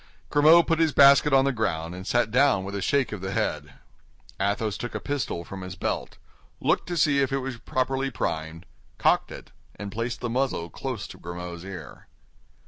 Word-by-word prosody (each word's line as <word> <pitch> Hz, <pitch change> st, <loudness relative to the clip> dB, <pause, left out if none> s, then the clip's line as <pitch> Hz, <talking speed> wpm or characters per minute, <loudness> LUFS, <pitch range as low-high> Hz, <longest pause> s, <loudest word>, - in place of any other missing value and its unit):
Grimaud 155 Hz, +4 st, +6 dB
put 165 Hz, -1 st, +1 dB
his 160 Hz, -3 st, +3 dB
basket 140 Hz, +1 st, +7 dB
on 135 Hz, 0 st, +5 dB
the 140 Hz, -, +2 dB
ground 90 Hz, -9 st, -2 dB
and 95 Hz, +1 st, -8 dB
sat 120 Hz, -3 st, +1 dB
down 130 Hz, -5 st, +3 dB
with 100 Hz, +1 st, -6 dB
a 100 Hz, -, -3 dB
shake 140 Hz, +5 st, +1 dB
of 105 Hz, -3 st, -5 dB
the 95 Hz, 0 st, -4 dB
head. -, -, -2 dB, 0.6 s
Athos 100 Hz, +2 st, 0 dB
took 120 Hz, -, -6 dB
a -, -, -1 dB
pistol 140 Hz, -12 st, -3 dB
from 95 Hz, +2 st, -8 dB
his 95 Hz, -1 st, -7 dB
belt, -, -, -3 dB, 0.4 s
looked -, -, +1 dB
to 175 Hz, -, -3 dB
see 145 Hz, -3 st, +3 dB
if 135 Hz, -1 st, +1 dB
it 135 Hz, -, +1 dB
was 130 Hz, -3 st, -5 dB
properly 135 Hz, +3 st, -1 dB
primed, 80 Hz, -6 st, -4 dB, 0.3 s
cocked -, -, +2 dB
it, -, -, -10 dB, 0.2 s
and 100 Hz, +1 st, -7 dB
placed 115 Hz, +3 st, -3 dB
the 120 Hz, -, -3 dB
muzzle 120 Hz, -, -1 dB
close 125 Hz, -, -5 dB
to -, -, -11 dB
Grimaud's 85 Hz, 0 st, -7 dB
ear. 95 Hz, -1 st, -9 dB
115 Hz, 195 wpm, -26 LUFS, 95-135 Hz, 0.6 s, basket